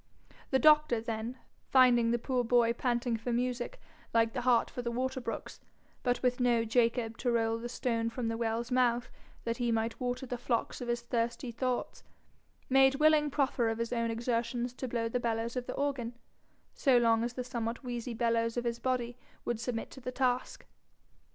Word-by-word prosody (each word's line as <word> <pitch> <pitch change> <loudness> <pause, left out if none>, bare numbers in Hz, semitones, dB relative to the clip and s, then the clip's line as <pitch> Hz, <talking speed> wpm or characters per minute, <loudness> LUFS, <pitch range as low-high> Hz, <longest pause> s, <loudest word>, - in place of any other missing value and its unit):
The 265 - +3
doctor, 300 -3 +5
then, 225 +2 -4 0.3
finding 245 -3 +5
the 240 - +2
poor 250 +1 -1
boy 235 0 +3
panting 240 -1 0
for 225 +2 -4
music 250 - -2 0.4
like 230 0 +3
the 250 - -2
hart 245 -1 +3
for 245 - -6
the 240 - -2
water 260 +2 -2
brooks, - - -6 0.4
but 245 0 0
with 250 0 +2
no 240 -2 +3
Jacob 230 0 +1
to 245 - +1
roll 225 -1 +1
the 240 +1 -5
stone 230 -2 -1
from 230 0 -3
the 225 - -1
well's 230 +1 -2
mouth 245 -1 +2 0.3
that 230 0 -2
he 240 -2 0
might 225 0 -1
water 250 0 -2
the 245 -1 -5
flocks 235 0 -1
of 245 - -4
his 240 0 -1
thirsty 235 +1 -2
thoughts, 250 +1 -2 0.7
made 270 0 +5
willing 300 0 +4
proffer 270 -5 +1
of 225 - -2
his 230 +1 -2
own 230 -1 0
exertions 235 +1 -1
to 260 +1 -5
blow 230 -1 -1
the 245 +2 -1
bellows 230 0 -2
of 250 -1 -3
the - - -3
organ, 260 -4 -2 0.6
so 265 -4 +4
long 230 -1 +3
as 240 0 -2
the 250 - -4
somewhat 235 0 -4
wheezy 240 -1 -4
bellows 230 0 +1
of 240 - 0
his 235 0 -2
body 250 -1 -2 0.3
would 240 -2 -1
submit 230 -1 -3
to 265 - -11
the 250 - -4
task. 255 -1 -1
240 Hz, 190 wpm, -31 LUFS, 230-250 Hz, 0.7 s, doctor